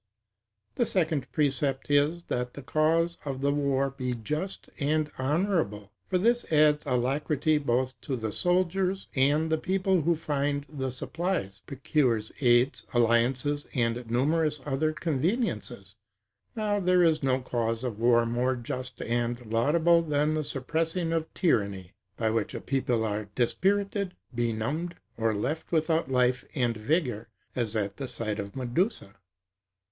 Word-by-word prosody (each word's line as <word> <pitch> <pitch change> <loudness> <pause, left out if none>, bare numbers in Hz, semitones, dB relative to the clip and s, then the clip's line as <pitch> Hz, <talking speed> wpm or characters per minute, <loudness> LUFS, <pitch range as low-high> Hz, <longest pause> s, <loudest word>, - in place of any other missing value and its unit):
The 240 - +1
second 160 -6 0
precept 140 -2 0
is, 150 +4 +3
that 125 -4 -3
the 140 - -8
cause 165 +4 +1
of 135 -2 -4
the 140 0 +2
war 140 -1 +1
be 130 -2 -3
just 150 - -4
and 150 +1 +1
honorable; 145 - 0 0.2
for 185 - +1
this 235 +6 +3
adds 150 -1 +4
alacrity 140 +4 +1
both 130 -1 -1
to 135 - -3
the 110 -3 -3
soldiers, 185 - +1
and 150 +4 +2
the 160 - +2
people 190 0 +1
who 170 +3 +2
find 145 -2 -1
the 135 -3 -3
supplies; 130 - -3
procures 130 -5 0
aids, 120 +1 +3
alliances, 125 +5 +2
and 120 -1 0
numerous 150 +5 +1
other 145 +2 0
conveniences. 155 - -2 0.6
Now 210 -2 0
there 180 -1 +4
is 160 -2 +3
no 130 -1 +2
cause 115 -2 -2
of 115 -4 -3
war 120 0 +4
more 120 +3 0
just 125 +1 -5
and 120 +1 -1
laudable 160 +10 +3
than 150 -1 +1
the 155 0 0
suppressing 165 +5 -1
of 160 -1 -1
tyranny; 100 - 0 0.3
by 110 -1 +1
which 110 -2 -1
a - - -3
people 125 -4 0
are 105 0 -2
dispirited, 200 - 0 0.2
benumbed, 120 +9 -2 0.2
or 115 -1 +1
left 150 +10 -3
without 160 -3 +1
life 125 -1 +2
and 120 -4 +1
vigor, 115 - -1 0.3
as 115 -3 -2
at 100 -2 -2
the 135 - -4
sight 115 -4 -2
of 100 0 -6
Medusa. 130 - -1
140 Hz, 140 wpm, -28 LUFS, 120-160 Hz, 0.6 s, adds